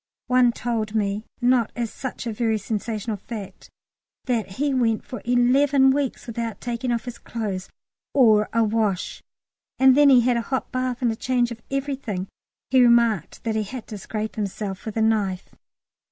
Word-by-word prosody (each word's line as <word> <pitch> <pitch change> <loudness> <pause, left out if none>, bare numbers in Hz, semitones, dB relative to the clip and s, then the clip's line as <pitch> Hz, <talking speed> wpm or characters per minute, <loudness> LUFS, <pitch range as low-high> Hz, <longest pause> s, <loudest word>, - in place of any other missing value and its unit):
One 250 -1 +4
told 225 -2 -3
me 205 0 -1 0.2
not 245 -2 +3
as 235 -2 -3
such 260 -2 -6
a 230 - -2
very 225 0 0
sensational 215 +1 -3
fact 200 -2 -9 0.6
that 230 -6 -1
he 285 +6 0
went 230 -4 +1
for 250 -5 -7
eleven 265 +3 +4
weeks 275 -1 -2
without 230 -1 -4
taking 240 +1 -3
off 235 0 -1
his 245 -1 -7
clothes, 200 -5 -4 0.4
or 220 -6 +4
a 230 0 +3
wash, 215 -4 -1 0.6
and 265 -1 +6
then 290 0 +6
he 255 -3 +7
had 245 0 +2
a - - 0
hot 260 +3 -3
bath 255 -1 -2
and 235 - +3
a - - -3
change 245 0 0
of 230 -1 -8
everything. 270 -9 -3 0.4
He 260 -1 +6
remarked 235 -7 +3
that 225 - -1
he 220 - 0
had 225 +3 -6
to 215 - -6
scrape 215 +2 -5
himself 200 -2 -4
with 220 - -4
a 220 - +3
knife. 200 -4 0
230 Hz, 175 wpm, -24 LUFS, 215-250 Hz, 0.6 s, he